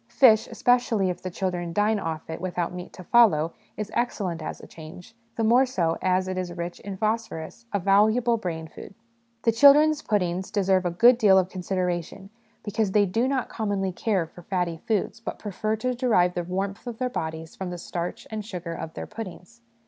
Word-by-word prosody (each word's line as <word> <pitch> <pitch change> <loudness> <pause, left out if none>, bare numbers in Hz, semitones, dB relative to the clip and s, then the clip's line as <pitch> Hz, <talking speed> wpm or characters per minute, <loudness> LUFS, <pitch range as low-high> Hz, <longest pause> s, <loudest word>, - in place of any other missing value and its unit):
Fish, 225 -5 +5
especially 230 -6 +2
if 180 - -8
the 185 - -4
children 175 -2 -3
dine 210 +2 +2
off 160 -3 -4
it 160 +1 -6
without 180 -1 -2
meat 180 0 -7
to 185 - -10
follow, 170 -8 +4 0.2
is 215 0 -4
excellent 195 -8 -1
as - - -5
a - - -11
change, 170 +6 -12 0.2
the 225 - -1
more 240 +4 +5
so 175 -11 0
as 185 0 +1
it 185 0 -2
is 180 -1 -4
rich 170 0 -5
in 195 -1 -7
phosphorus 220 -1 -3
a 205 - +1
valuable 215 +5 +3
brain 165 -7 -4
food. 180 - -12 0.5
The 230 - +4
children's 290 +5 +6
puddings 185 -3 -1
deserve 190 -2 +2
a - - +1
good 235 +8 +5
deal 195 -4 +6
of 185 -1 +2
consideration, 185 0 -3 0.3
because 205 -1 -1
they 205 -1 +5
do 225 +7 0
not 265 -2 -1
commonly 200 -3 -2
care 190 -1 0
for 170 +2 -14
fatty 175 -2 -2
foods, 215 -1 0
but 225 - -6
prefer 215 +1 -2
to 250 +3 -1
derive 220 -8 +2
the 175 - -2
warmth 195 +5 -4
of 235 -2 -5
their 255 - -1
bodies 160 -8 -5
from 190 -1 -5
the 180 - -5
starch 175 0 -5
and 215 -1 -4
sugar 180 -5 -6
of 160 -1 -7
their - - -5
puddings. 185 - -9
190 Hz, 195 wpm, -25 LUFS, 175-220 Hz, 0.5 s, children's